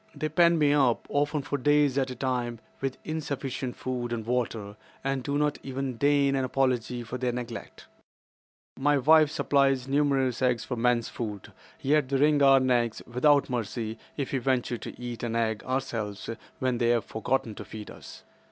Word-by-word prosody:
"They 155 - -2
pen 170 +2 +4
me 145 -2 +4
up, 135 -5 +2
often 145 0 0
for 145 0 -2
days 145 0 +3
at 135 -1 +1
a 130 - -5
time, 125 -2 -2 0.2
with 135 -1 -3
insufficient 140 -5 -4
food 125 -2 -4
and 115 -2 -3
water, 115 -4 -2 0.3
and 135 -1 -1
do 140 +2 -1
not 150 0 0
even 135 -2 -4
deign 140 +1 +3
an 135 - 0
apology 125 -2 0
for 120 +2 -6
their 125 0 0
neglect. 120 -1 -7 0.9
"My 145 +1 +3
wives 155 +2 +5
supply 140 -1 +3
numerous 135 -3 +1
eggs 125 -3 +2
for 125 - -3
men's 120 0 +1
food, 105 -4 -6 0.3
yet 145 -1 +2
they 135 - +1
wring 145 +1 +4
our 135 -1 +7
necks 120 -3 +1
without 140 +4 +3
mercy 115 -2 -3 0.2
if 140 -3 -3
we 135 - +1
venture 125 -2 0
to - - -8
eat 120 -1 -6
an 115 -1 -2
egg 110 -2 0
ourselves 115 -6 -3 0.3
when 130 -2 0
they 120 -1 +2
have 120 -1 +2
forgotten 115 0 -1
to 105 - -8
feed 105 0 -9
us. - - -12
130 Hz, 180 wpm, -27 LUFS, 120-140 Hz, 0.9 s, our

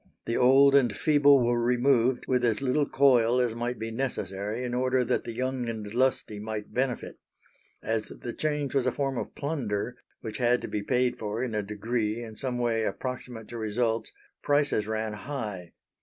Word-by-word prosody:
The 115 - -1
old 135 +2 +6
and 125 -7 +3
feeble 145 -4 +5
were 120 0 +1
removed, 125 0 +2
with 125 -1 +1
as 115 -3 +3
little 140 +2 +1
coil 125 -3 +4
as 120 -2 +1
might 120 +1 -3
be 110 +1 -5
necessary, 110 -3 -3
in 125 -1 -3
order 130 0 +2
that - - 0
the 115 - -4
young 125 0 -2
and 110 -2 -4
lusty 125 -4 0
might 105 0 -5
benefit. 125 -1 -2 0.6
As 110 -1 -1
the 120 - -7
change 150 -2 -2
was 135 -3 +1
a - - +3
form 135 -2 -2
of - - -5
plunder, 125 -6 -2 0.3
which 110 -1 -5
had 120 0 +3
to - - -3
be 105 - -3
paid 125 +3 0
for 110 +3 -3
in 125 -3 -3
a 105 - 0
degree 110 +2 -2
in 110 -2 -9
some 125 +1 -3
way 120 -2 +1
approximate 120 +1 -4
to 120 - -6
results, 115 +1 -1 0.3
prices 145 -7 +1
ran 110 0 -2
high. 105 -7 -6
120 Hz, 185 wpm, -28 LUFS, 110-130 Hz, 0.6 s, old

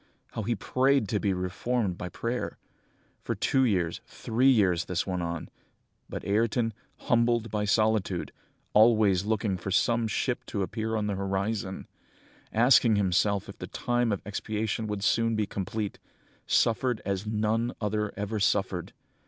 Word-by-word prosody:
How - - -4
he 115 +3 -1
prayed 130 +1 +2
to 105 - +1
be 100 - +1
reformed 95 +3 -1
by 90 - -6
prayer! 120 +6 -3 0.6
For - - -3
two 130 -1 +2
years, 90 -7 0
three 125 +4 +1
years, 95 -9 +3
this 90 -1 -1
went 90 -2 -2
on; 85 -1 -4 0.6
but - - -6
Ayrton, 115 +2 +1 0.3
humbled 120 -2 +2
by 105 -1 0
solitude, 105 -4 +1 0.4
always 105 -4 +5
looking 105 -3 0
for 100 - -6
some 115 +4 +2
ship 120 +3 -1
to 100 -3 -2
appear 110 +3 -3
on 105 -1 0
the 105 - -1
horizon, 100 +1 -2 0.7
asking 115 -1 +5
himself 100 0 +1
if - - -11
the - - -6
time 120 -1 0
of 100 - -2
expiation 110 +1 -2
would 105 -2 -3
soon 115 +1 +2
be 110 -1 +1
complete, 100 +1 -4 0.5
suffered 120 0 +2
as 100 +1 -2
none 110 +2 0
other 105 0 -1
ever 105 +1 -2
suffered! 95 -3 0
105 Hz, 150 wpm, -28 LUFS, 100-115 Hz, 0.7 s, always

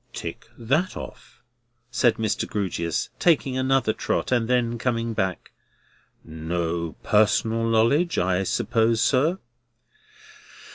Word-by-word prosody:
"Tick - - -7
that 140 +11 0
off," - - -11 0.5
said 115 0 +3
Mr. 110 -2 -1
Grewgious, 90 -5 -2
taking 145 -6 +2
another 130 -3 +1
trot, 115 - -2
and 120 -3 +2
then 120 -1 0
coming 115 -1 -1
back. 95 -4 -3 0.7
"No 80 +1 -3
personal 110 +2 +2
knowledge, 115 +10 +2
I 90 +1 +1
suppose, 115 +3 +1
sir?" 150 +10 +2
115 Hz, 105 wpm, -24 LUFS, 95-125 Hz, 0.7 s, said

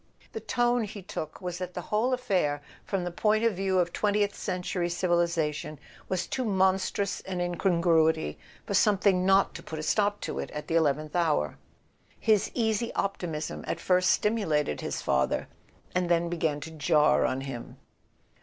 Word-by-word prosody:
The 445 - -3
tone 240 - +1
he 205 -1 -8
took 155 -2 -6
was 180 -1 -4
that 180 -1 -5
the 180 - -4
wdiole 220 +5 0
affair, 185 - 0 0.2
from 195 -3 -2
the 175 - -3
point 215 +5 +2
of 230 -2 +3
view 190 0 0
of 175 -1 +1
twentieth 205 -1 +1
century 180 -2 -2
civilization, 170 -4 0 0.3
was 185 -1 0
too 260 - -2
monstrous 190 -1 +1
an 185 -2 -3
incongruity 170 - +2 0.3
for - - -3
something 195 -2 +3
not 195 0 +4
to - - -8
put 160 - -7
a 155 - -4
stop 205 +5 +1
to - - -4
it - - -4
at 150 - -4
the - - -3
eleventh 155 -1 +1
hour. 155 - +1 0.6
His 215 -3 +3
easy 225 -1 0
op¬ 195 0 0
timism 160 -3 -4
at - - -2
first 185 0 +3
stimulated 160 - +1
his - - -4
father, 65 0 +1 0.5
and 180 -1 0
then 170 0 +2
began 160 -4 -1
to 160 - -7
jar 155 -1 +3
on 130 +1 0
him. 135 -3 -7
180 Hz, 170 wpm, -28 LUFS, 160-200 Hz, 0.6 s, not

